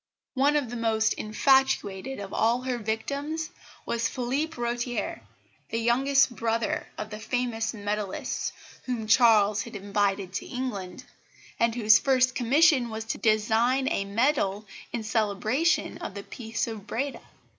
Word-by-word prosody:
One 280 +2 +3
of 275 -6 0
the - - -4
most 220 -1 +2
infatuated 265 -1 +1
of 200 -1 -7
all 235 +3 +2
her 255 -2 -2
victims 280 +9 -3 0.3
was 235 0 0
Phillipe 275 +6 -2
Rotier, 240 0 -2 0.5
the 225 - -2
youngest 255 +2 +3
brother 230 -1 -1
of 215 - -6
the 210 - -6
famous 225 -1 -1
medallists 205 -2 -3 0.3
whom 245 -4 -3
Charles 215 -2 +5
had 230 +1 -8
invited 200 -1 -1
to - - -4
England, 245 -4 -5 0.6
and 230 0 +2
whose 215 -3 +6
first 260 -1 +3
commission 265 +1 +4
was 220 0 -4
to - - -3
design 225 +4 +2
a 195 - -1
medal 210 -2 +1 0.3
in 235 -2 -3
celebration 220 - 0
of 190 - -6
the 200 - -6
Peace 225 -1 -4
of 220 -3 -7
Breda. 265 +6 -3
230 Hz, 140 wpm, -27 LUFS, 215-255 Hz, 0.6 s, whose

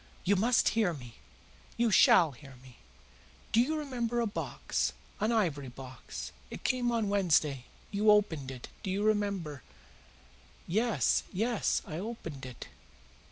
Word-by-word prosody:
"You 200 - +3
must 230 +5 +3
hear 210 -7 +1
me. 120 -4 -11 0.6
You 235 -1 +2
SHALL 170 -4 +6
hear 135 +1 -13
me. 130 -2 -15 0.7
Do 230 - +5
you 310 +6 0
remember 240 -5 -2
a 235 - +2
box 210 -1 -2 0.3
an 215 +2 +1
ivory 165 - 0
box? 130 0 -8 0.2
It - - -8
came 245 -2 +1
on 230 -3 0
Wednesday. 155 -9 +2 0.3
You 210 +1 +2
opened 170 -10 +3
it 130 -2 -8
do - - -4
you 195 +2 0
remember?" 200 - 0 1.0
"Yes, 220 +5 +2
yes, 220 +3 0
I 160 -3 -5
opened 165 - -6
it. 125 - -9
200 Hz, 140 wpm, -31 LUFS, 145-225 Hz, 1.0 s, SHALL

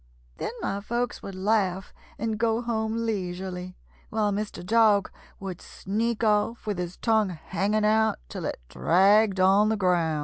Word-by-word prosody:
Then - - -3
my 200 - -1
folks 240 +3 -2
would 195 - -7
laugh 190 -1 0 0.2
and 220 -1 -2
go 225 0 +2
home 225 -1 -1
leisurely, 185 -3 -4 0.3
while 210 -1 0
Mr. 200 -3 -4
Dog 215 -2 +4 0.3
would 190 -3 -6
sneak 225 +4 -2
off 215 +2 +1
with 205 -4 -2
his 180 0 -4
tongue 220 -3 +2
hanging 195 +5 -1
out 220 +1 +3
till - - -6
it - - -3
dragged 195 - +3
on 195 +3 +5
the 220 - +1
ground." 170 -5 +1
205 Hz, 150 wpm, -26 LUFS, 185-220 Hz, 0.3 s, on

